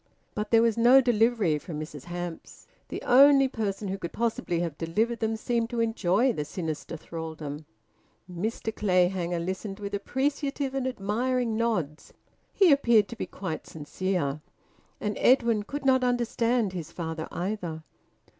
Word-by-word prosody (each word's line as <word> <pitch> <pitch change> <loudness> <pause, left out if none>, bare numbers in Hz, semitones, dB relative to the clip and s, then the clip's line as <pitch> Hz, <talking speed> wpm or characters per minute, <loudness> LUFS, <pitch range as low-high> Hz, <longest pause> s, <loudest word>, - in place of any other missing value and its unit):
But 210 0 -3
there 230 0 +5
was 230 -1 +2
no 245 +3 +7
delivery 225 - +2
from 155 -1 -7
Mrs 150 -3 -8
Hamps. 175 -1 -7 0.2
The - - -6
only 275 +2 +7
person 210 -5 -3
who 195 +1 -3
could 170 - -5
possibly 225 -7 -1
have 165 -4 -3
delivered 220 +8 0
them 220 0 0
seemed 230 0 -1
to 240 -1 -3
enjoy 225 +1 +2
the 150 - -2
sinister 160 +1 -5
thraldom. 160 -2 -7 0.6
Mr 215 +5 -4
Clayhanger 180 -2 +1
listened 190 +4 -4
with 200 0 -6
appreciative 275 +5 -1
and 270 -1 -1
admiring 240 +1 -1
nods; 180 -10 -2 0.4
he 385 -5 +5
appeared 235 -7 +4
to 235 - -7
be - - -4
quite 185 -5 -6
sincere. 155 -1 -2 0.6
And 210 0 -2
Edwin 235 -4 +4
could 275 +7 -6
not 260 -1 +4
understand 240 -3 +1
his 165 -3 -6
father 160 -2 -5
either. 175 -4 -4
210 Hz, 145 wpm, -27 LUFS, 170-240 Hz, 0.6 s, no